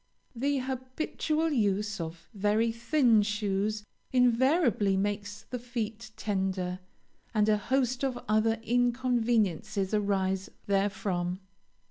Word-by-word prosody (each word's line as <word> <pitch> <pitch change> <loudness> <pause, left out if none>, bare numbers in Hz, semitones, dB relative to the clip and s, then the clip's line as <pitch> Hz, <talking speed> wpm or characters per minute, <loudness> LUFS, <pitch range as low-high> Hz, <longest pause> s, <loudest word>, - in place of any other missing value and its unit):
The 280 +4 0
habitual 265 +5 -2
use 210 - 0
of 165 +1 -7
very 210 +3 +2
thin 235 -1 +3
shoes 210 0 -1 0.3
invariably 250 - +3
makes 205 +1 -2
the 250 - -6
feet 230 -2 -4
tender, 190 -3 -1 0.6
and 210 0 +3
a 215 -1 +4
host 255 +3 0
of 260 -2 0
other 220 +1 +2
inconveniences 230 -5 +1
arise 195 -2 0 0.2
therefrom. 195 -3 0
215 Hz, 100 wpm, -29 LUFS, 200-245 Hz, 0.6 s, a